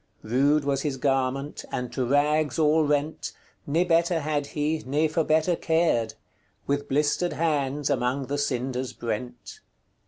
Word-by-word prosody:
Rude 140 +6 +2
was 140 -1 0
his 140 -2 -2
garment, 135 +1 -1
and 125 -1 -4
to 130 - -1
rags 145 +4 +2
all 155 0 +4
rent, 145 +1 -1 0.3
Ne 160 +5 +2
better 170 -1 +2
had 145 -1 -1
he, 155 +2 -1
ne 145 +5 +1
for 160 +1 0
better 160 +3 +2
cared; 160 -11 +1 0.5
With 145 0 -1
blistered 150 +5 +1
hands 145 -3 0
among 130 0 0
the 145 +2 -2
cinders 130 -2 -2
brent." 120 +1 -5
145 Hz, 145 wpm, -26 LUFS, 130-155 Hz, 0.5 s, all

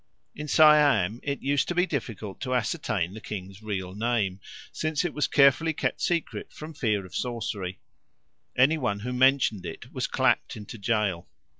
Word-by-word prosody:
In 150 - -7
Siam 145 - +5
it 140 -1 -4
used 140 +1 +1
to 175 - -2
be 180 +1 +3
difficult 110 - -5
to 130 -1 -1
ascertain 110 - -1
the 110 - -9
king's 95 -1 -7
real 95 -4 -4
name, 105 -3 -1 0.3
since 155 +1 -1
it 175 - -2
was 150 - +1
carefully 145 +3 +4
kept - - -2
secret 170 -2 -2
from 155 +1 -9
fear 105 -9 0
of 90 - -14
sorcery; 105 -7 -3 0.8
any 145 +6 +4
one 100 -6 -1
who 125 +3 -4
mentioned 130 -5 +3
it - - -8
was - - -1
clapped - - +1
into 105 +1 -9
gaol. 100 -5 -1
120 Hz, 165 wpm, -27 LUFS, 100-145 Hz, 0.8 s, Siam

